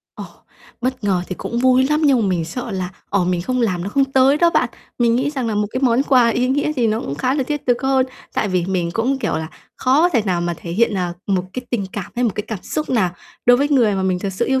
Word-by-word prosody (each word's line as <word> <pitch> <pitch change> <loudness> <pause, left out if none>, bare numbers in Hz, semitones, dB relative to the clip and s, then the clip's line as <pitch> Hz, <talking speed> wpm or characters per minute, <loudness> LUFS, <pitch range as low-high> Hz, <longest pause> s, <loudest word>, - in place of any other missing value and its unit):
Ồ! - - -7 0.6
Bất 255 -2 -2
ngờ 190 -3 +1
thì 185 - -4
cũng 235 - -4
vui 255 +1 +4
lắm 300 +2 +1
nhưng 270 -4 +4
mà 215 - +1
mình 175 -3 0
sợ 235 +8 -5
là, 185 -2 -3 0.2
ờ, 200 -3 +2
mình 175 -1 0
không 255 +6 -1
làm 185 -7 0
nó - - -3
không 275 +5 +3
tới 270 +1 +3
đó 340 +2 +4
bạn. - - +2 0.3
Mình 235 -1 +3
nghĩ 265 +4 0
rằng 265 -5 -3
là 220 - -1
một 210 0 +1
cái 255 - -3
món 250 0 +3
quà 255 -4 +4
ý 245 +2 +1
nghĩa 285 +3 +1
gì 250 -6 +1
nó 220 +1 0
cũng 140 - -4
khá 255 - 0
là 280 - +1
thiết 295 +2 -3
thực 245 0 +1
hơn 265 -1 +2 0.3
tại 210 - 0
vì 180 -2 0
mình 180 -3 -1
cũng, 255 +6 0
kiểu - - -2
là, 160 0 -4 0.3
khó 280 +7 +3
thể 250 -11 +1
nào 185 -4 0
mà 175 0 -1
thể 170 - -8
hiện, 220 +4 +2
à, 180 -2 -1
một 190 -3 +1
cái 255 - -4
tình 210 -6 -1
cảm 200 -4 -6
hay 245 - +1
một 235 - +2
cái 210 - -2
cảm 215 -5 -5
xúc 305 - -3
nào 215 -8 +2 0.4
đối 245 0 +7
với 285 +3 +1
người 240 -8 +3
mà 190 - -1
mình 185 -1 0
thật 195 +2 -3
sự 185 - -1
yêu 265 0 +1
235 Hz, 290 wpm, -19 LUFS, 190-265 Hz, 0.6 s, đối